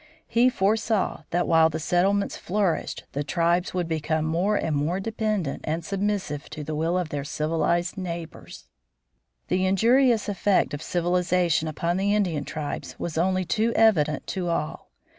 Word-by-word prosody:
He 240 Hz, +2 st, +4 dB
foresaw 210 Hz, -, 0 dB
that 175 Hz, +1 st, 0 dB
while 160 Hz, -1 st, +5 dB
the 160 Hz, -, -3 dB
settlements 195 Hz, +5 st, +1 dB
flourished 195 Hz, -2 st, -1 dB
the 145 Hz, -, -2 dB
tribes 170 Hz, +3 st, 0 dB
would 175 Hz, -2 st, -1 dB
become 155 Hz, -1 st, -1 dB
more 175 Hz, +6 st, +1 dB
and 160 Hz, -6 st, 0 dB
more 155 Hz, +6 st, 0 dB
dependent 215 Hz, -, -2 dB
and 160 Hz, +1 st, -3 dB
submissive 195 Hz, -6 st, -2 dB
to 150 Hz, 0 st, -6 dB
the 155 Hz, -, -4 dB
will 165 Hz, +4 st, 0 dB
of 180 Hz, -3 st, -2 dB
their 145 Hz, -2 st, -3 dB
civilized 165 Hz, +5 st, -1 dB
neighbors. 170 Hz, -3 st, -7 dB, 0.8 s
The 185 Hz, +1 st, +1 dB
injurious 230 Hz, +4 st, +3 dB
effect 200 Hz, -3 st, +1 dB
of 145 Hz, -, -4 dB
civilization 175 Hz, -1 st, +1 dB
upon 170 Hz, +3 st, -1 dB
the 200 Hz, +2 st, +1 dB
Indian 170 Hz, -9 st, 0 dB
tribes 150 Hz, -2 st, -5 dB
was 170 Hz, -, -4 dB
only 185 Hz, +2 st, +1 dB
too 225 Hz, +5 st, +1 dB
evident 155 Hz, -10 st, +3 dB
to 180 Hz, -3 st, -3 dB
all. 155 Hz, -2 st, -3 dB
175 Hz, 155 wpm, -25 LUFS, 160-200 Hz, 0.8 s, while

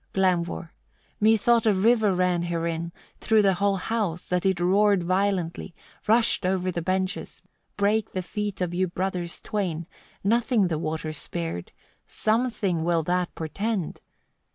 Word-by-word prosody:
Glaumvor. 180 Hz, -2 st, 0 dB, 0.5 s
25. -, -, -39 dB
"Methought 225 Hz, +2 st, +4 dB
a 215 Hz, -, +5 dB
river 220 Hz, +1 st, +3 dB
ran 180 Hz, -1 st, +1 dB
herein, 170 Hz, -1 st, -2 dB, 0.3 s
through 220 Hz, -1 st, +3 dB
the 195 Hz, -1 st, +4 dB
whole 200 Hz, +2 st, +1 dB
house, 190 Hz, -4 st, -2 dB
that 180 Hz, +1 st, +1 dB
it 190 Hz, -3 st, +1 dB
roared 195 Hz, +1 st, +3 dB
violently, 185 Hz, -1 st, -1 dB, 0.3 s
rushed 225 Hz, -1 st, +4 dB
o'er 185 Hz, 0 st, 0 dB
the 170 Hz, -, -3 dB
benches, 185 Hz, +2 st, -2 dB, 0.3 s
brake 205 Hz, +1 st, +1 dB
the 185 Hz, -, -2 dB
feet 205 Hz, +1 st, -4 dB
of 175 Hz, -1 st, -1 dB
you 185 Hz, +1 st, +1 dB
brothers 180 Hz, -1 st, -3 dB
twain; 175 Hz, -6 st, -3 dB, 0.4 s
nothing 225 Hz, -1 st, +2 dB
the 160 Hz, -2 st, -1 dB
water 155 Hz, 0 st, -3 dB
spared: 165 Hz, -, -5 dB, 0.4 s
something 215 Hz, -7 st, 0 dB
will 170 Hz, -1 st, +1 dB
that 180 Hz, +2 st, -1 dB
portend! 195 Hz, +3 st, -3 dB
185 Hz, 140 wpm, -25 LUFS, 170-210 Hz, 0.5 s, a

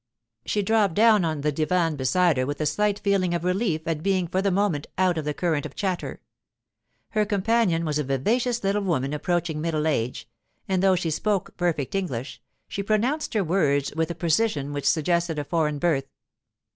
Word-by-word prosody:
She 205 Hz, -, 0 dB
dropped 205 Hz, -4 st, +2 dB
down 215 Hz, -2 st, +5 dB
on 155 Hz, -3 st, -1 dB
the 150 Hz, +1 st, +1 dB
divan 165 Hz, +2 st, +1 dB
beside 150 Hz, +4 st, +2 dB
her 130 Hz, 0 st, 0 dB
with 145 Hz, -, -4 dB
a 155 Hz, -, 0 dB
slight 210 Hz, +5 st, +1 dB
feeling 190 Hz, -4 st, +1 dB
of 170 Hz, -, -3 dB
relief 180 Hz, -4 st, -1 dB
at 160 Hz, -2 st, -1 dB
being 185 Hz, -1 st, +1 dB
for 185 Hz, +3 st, 0 dB
the 200 Hz, -, +1 dB
moment 185 Hz, -6 st, 0 dB
out 185 Hz, -1 st, +3 dB
of 160 Hz, -2 st, -3 dB
the 150 Hz, -, -1 dB
current 160 Hz, -5 st, 0 dB
of -, -, -8 dB
chatter. 185 Hz, -3 st, -3 dB, 0.9 s
Her 215 Hz, -1 st, +1 dB
companion 205 Hz, -4 st, +1 dB
was 150 Hz, -1 st, -1 dB
a -, -, 0 dB
vivacious 230 Hz, -, 0 dB
little 200 Hz, +1 st, +1 dB
woman 150 Hz, -8 st, -1 dB
approaching 165 Hz, 0 st, -1 dB
middle 155 Hz, -2 st, -1 dB
age; 125 Hz, -6 st, -1 dB, 0.4 s
and 190 Hz, -1 st, +1 dB
though 190 Hz, -1 st, +4 dB
she 170 Hz, -2 st, -1 dB
spoke 200 Hz, +4 st, -1 dB
perfect 170 Hz, -6 st, -1 dB
English, 150 Hz, -10 st, -3 dB, 0.3 s
she 200 Hz, -, -4 dB
pronounced 230 Hz, +9 st, 0 dB
her 210 Hz, -, +2 dB
words 150 Hz, -6 st, +1 dB
with 160 Hz, +1 st, 0 dB
a 170 Hz, -, -4 dB
precision 160 Hz, -4 st, 0 dB
which 145 Hz, -1 st, +1 dB
suggested 170 Hz, 0 st, +1 dB
a 145 Hz, -, -1 dB
foreign 150 Hz, -1 st, 0 dB
birth. 140 Hz, -3 st, 0 dB
175 Hz, 190 wpm, -25 LUFS, 150-195 Hz, 0.9 s, down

